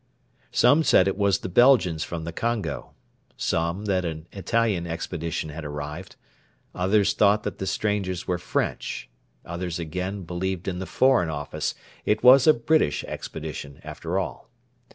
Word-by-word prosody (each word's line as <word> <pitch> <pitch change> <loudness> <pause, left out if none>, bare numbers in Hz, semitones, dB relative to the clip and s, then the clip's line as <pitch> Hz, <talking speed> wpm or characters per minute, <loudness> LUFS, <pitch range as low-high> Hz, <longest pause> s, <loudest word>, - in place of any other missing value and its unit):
Some 150 +3 +5
said 95 -10 +5
it 95 - 0
was 100 -1 +2
the - - -6
Belgians 95 - +4
from 85 -2 -5
the 85 - -4
Congo; 100 - -3 0.4
some 85 +5 -1
that 95 -3 +1
an 80 -2 -4
Italian 100 -2 0
expedition 80 -1 -4
had 80 +2 -7
arrived; 75 +4 -6 0.6
others 100 +3 +2
thought 105 0 +3
that 105 - -5
the 95 - -3
strangers 95 -2 -1
were 90 -1 0
French; 85 - -3 0.3
others, 85 0 -4
again, 90 +4 -4
believed 90 +1 -3
in 90 -2 -2
the 95 - -5
Foreign 130 -10 +3
Office 75 -2 -3 0.3
it 105 - +1
was 130 +2 +8
a 155 - +9
British 120 - +1
expedition, 75 -3 -7
after 80 +4 -4
all. 95 - -4
90 Hz, 150 wpm, -25 LUFS, 80-105 Hz, 0.6 s, a